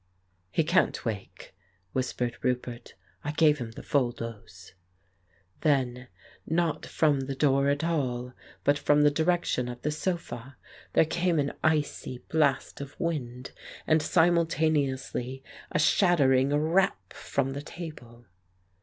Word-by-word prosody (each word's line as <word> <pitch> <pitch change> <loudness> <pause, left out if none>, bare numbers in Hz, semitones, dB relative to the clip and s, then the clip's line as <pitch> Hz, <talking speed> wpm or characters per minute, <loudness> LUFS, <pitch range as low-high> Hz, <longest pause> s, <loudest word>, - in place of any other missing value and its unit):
"He 160 - +1
can't 175 -3 +1
wake," 105 -4 -6 0.4
whispered 125 -2 -1
Roupert. 125 -1 -3 0.3
"I 145 - -3
gave 150 -2 +4
him 120 -2 -4
the - - -9
full 130 -4 +1
dose." 105 -6 -9 0.9
Then, 130 -4 +1 0.4
not 165 0 -1
from 150 -3 +2
the 135 0 -3
door 140 0 +3
at 145 +2 0
all, 125 -7 -1 0.3
but 145 0 +3
from 145 0 +4
the 145 - +5
direc 170 +4 +1
tion 125 -1 0
of 120 0 -8
the 150 - 0
sofa 150 -6 -4 0.4
there - - +5
came 170 +1 0
an 140 -1 0
icy 150 -4 0
blast 140 -4 +1
of 140 -1 -9
wind, 130 -7 -3 0.3
and 155 0 +3
simultaneously 150 -6 +1 0.3
a - - +1
shattering 140 -6 +4
rap 160 +7 +1
from 135 -1 -2
the 140 - -4
table. 145 -8 -10
140 Hz, 130 wpm, -28 LUFS, 125-160 Hz, 0.9 s, the